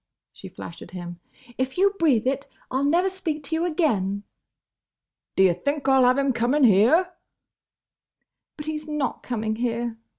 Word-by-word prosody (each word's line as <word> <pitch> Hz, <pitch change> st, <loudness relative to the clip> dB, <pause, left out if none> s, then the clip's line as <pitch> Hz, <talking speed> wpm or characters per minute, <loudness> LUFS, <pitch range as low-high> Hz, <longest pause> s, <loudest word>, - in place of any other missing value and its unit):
she -, -, -11 dB
flashed 165 Hz, 0 st, -10 dB
at -, -, -10 dB
him, 175 Hz, -1 st, -7 dB, 0.4 s
"If 260 Hz, +3 st, -2 dB
you 395 Hz, +2 st, +4 dB
breathe 270 Hz, -9 st, +3 dB
it, 270 Hz, +2 st, -1 dB, 0.2 s
I 260 Hz, -, 0 dB
'll -, -, 0 dB
never 345 Hz, +6 st, +3 dB
speak 330 Hz, -6 st, -3 dB
to 320 Hz, +3 st, -3 dB
you 330 Hz, +2 st, 0 dB
again!" 210 Hz, -, 0 dB, 1.1 s
"D' -, -, +3 dB
ye 185 Hz, -2 st, +5 dB
think 285 Hz, -, -3 dB
I 265 Hz, 0 st, +5 dB
'll 255 Hz, -, +5 dB
have 250 Hz, +1 st, +4 dB
him 275 Hz, -1 st, +1 dB
coming 245 Hz, +5 st, +1 dB
here—?" 250 Hz, -, +5 dB, 1.5 s
"But 300 Hz, -, -7 dB
he's 310 Hz, 0 st, -4 dB
not 300 Hz, -3 st, -2 dB
coming 220 Hz, -3 st, -3 dB
here!" 235 Hz, -1 st, -2 dB
265 Hz, 170 wpm, -24 LUFS, 225-310 Hz, 1.5 s, ye